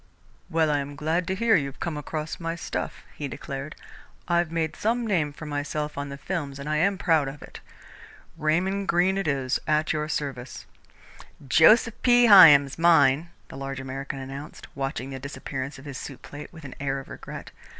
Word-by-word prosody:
"Well, 160 -1 +2
I 145 - +2
am 140 +1 -6
glad 160 +4 -1
to 190 - -1
hear 225 +2 +3
you've 140 -5 -1
come 170 -2 -3
across 155 +2 -5
my 165 -1 -3
stuff," 170 - -5
he 145 - -4
declared. 140 +1 -6 0.5
"I've 170 -2 +1
made 165 -1 -1
some 235 +2 0
name 170 -9 +1
for 155 +2 -10
myself 150 0 -3
on 140 0 -4
the 140 - -7
films 145 -4 -4
and 140 +1 -7
I 155 0 0
am 195 +5 +2
proud 160 -6 +2
of 140 +1 -8
it. - - -11 0.8
Raymond 180 +6 0
Greene 185 +3 +2
it 195 - -2
is, 135 -3 0
at 155 +1 +2
your 155 0 -2
service." 135 -5 -4 0.8
"Joseph 215 - +5
P. 245 -1 +5
Hyam's 160 - +8
mine," 165 -2 +4 0.2
the - - -9
large 135 0 -5
American 135 +1 -5
announced, 135 +2 -8
watching 135 -1 -4
the 135 - -6
disappearance 135 0 -6
of 135 - -13
his 135 -2 -6
soup 135 - -9
plate 145 +1 -9
with 160 -3 -13
an 130 - -8
air 135 0 -1
of 135 - -11
regret. - - -9
150 Hz, 185 wpm, -26 LUFS, 140-170 Hz, 0.8 s, Hyam's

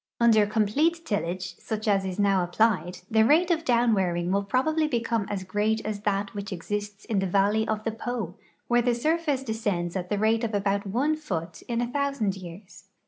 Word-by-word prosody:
Under 220 -3 +5
complete 290 +12 +1
tillage, 185 - -3
such 220 0 -4
as 195 -2 +2
is 185 -1 -4
now 200 -3 +3
applied, 180 -1 +1
the 220 0 +5
rate 325 +9 +4
of 330 -1 +1
downwearing 195 - +2
will 200 +1 +2
probably 305 +9 +1
become 230 -5 -1
as 195 -2 -3
great 210 +3 0
as 210 -1 -3
that 200 0 -1
which 205 0 -6
exists 205 +3 -4
in 220 -5 0
the 195 - 0
valley 205 +4 +2
of 215 0 -2
the 225 - -1
Po, 225 -5 -4 0.3
where 240 0 +3
the 240 0 +1
surface 300 +1 0
descends 205 -7 -2
at 180 -1 -3
the 205 - 0
rate 220 +3 +2
of 220 -2 -1
about 200 0 0
one 265 +10 +1
foot 175 - -5
in 235 -1 -1
a 240 - 0
thousand 275 -6 -1
}''ears. 185 +1 -11
215 Hz, 195 wpm, -26 LUFS, 195-240 Hz, 0.3 s, Under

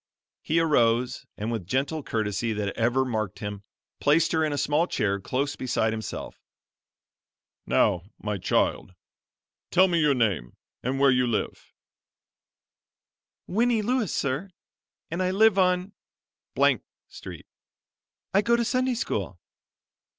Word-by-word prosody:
He 165 +2 +1
arose, 125 -6 +2
and 110 +3 -3
with 110 -7 -4
gentle 140 - -1
courtesy 110 -2 -2
that 105 -2 -3
ever 125 +3 +2
marked 110 -6 -2
him, 105 -1 -6 0.4
placed 150 +3 +3
her 160 -1 +2
in 155 - 0
a 145 - -2
small 150 +4 +1
chair 100 - 0
close 135 +7 -2
beside 110 -3 0
himself. 110 0 -6 1.3
"Now, 85 - +3 0.2
my 105 -2 -3
child, 90 +1 0 0.7
tell 185 +1 +5
me 170 -2 +1
your 150 -3 +3
name, 100 - -1 0.2
and 130 +2 -2
where 140 -1 +5
you 125 -1 +2
live." 115 -3 -3 1.7
"Winnie 230 +2 +1
Lewis 245 -3 0
sir, 140 +8 -2 0.6
and 170 +3 -2
I 185 - +1
live 200 +1 +4
on 180 +1 +2 1.1
Street. - - -10 0.9
I 195 - +5
go 235 +3 +3
to 235 0 0
Sunday 255 +1 +1
school." 240 - -3
135 Hz, 130 wpm, -26 LUFS, 110-180 Hz, 1.7 s, tell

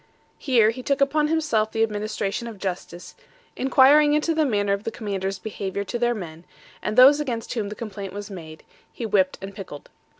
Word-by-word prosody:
Here 235 -6 +3
he 255 +3 -8
took 280 +2 0
upon 295 +2 +2
himself 300 -9 0
the 225 - +1
administration 215 +1 -2
of 225 -3 -8
justice, 180 -2 -6 0.4
inquiring 285 +3 +5
into 305 +2 +1
the 315 -1 +2
manner 205 -4 +1
of 200 +1 -3
the - - -2
commanders' 195 -4 -4
behaviour 200 -1 -4
to 235 +4 -4
their 240 0 +1
men, 165 -5 -8 0.4
and 215 +2 -3
those 275 +4 +8
against 240 -6 -3
whom 215 -5 -2
complaint 205 -2 -7
was 205 +2 -7
made, 160 -4 -10 0.3
he 235 - -6
whipped 190 -3 +2
and 195 +1 -7
pickled. 190 -7 -10
215 Hz, 180 wpm, -24 LUFS, 195-255 Hz, 0.4 s, those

